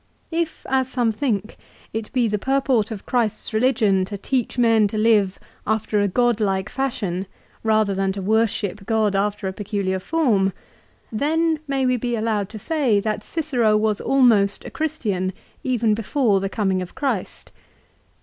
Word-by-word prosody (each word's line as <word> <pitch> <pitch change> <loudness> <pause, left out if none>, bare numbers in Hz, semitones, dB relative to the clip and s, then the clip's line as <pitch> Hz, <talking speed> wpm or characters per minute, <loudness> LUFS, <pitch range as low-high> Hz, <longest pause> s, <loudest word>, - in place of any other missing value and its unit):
If, 330 -1 -2
as 260 -1 +1
some 245 -3 +1
think, 215 -3 -2 0.4
it 220 -1 -4
be 250 -3 +2
the 210 -1 -1
purport 265 -3 +1
of 215 -4 -7
Christ's 220 -3 -1
religion 220 -5 +3
to 200 +1 -6
teach 250 +5 -2
men 225 -3 +4
to 215 - -4
live 210 -3 +3 0.3
after 220 -1 +1
a 205 - +2
godlike 205 -3 +1
fashion 200 -9 -2 0.3
rather 215 -2 +2
than 195 0 0
to 195 - -5
worship 210 -2 0
God 215 -3 +2
after 205 0 0
a 190 - -3
peculiar 195 -2 -2
form, 210 - +1 0.6
then 315 +7 +1
may 270 -1 0
we 255 0 +2
be 240 0 -2
allowed 215 -3 -1
say 240 -1 +1
that 215 0 -2
Cicero 250 -10 +1
was 215 -1 0
almost 225 -7 +3
a - - -7
Christian, 210 -13 -2 0.3
even 235 -4 +1
before 225 -1 +1
the 195 0 -2
coming 190 -3 0
of 180 - -8
Christ. 260 -9 -3
220 Hz, 155 wpm, -22 LUFS, 200-255 Hz, 0.6 s, men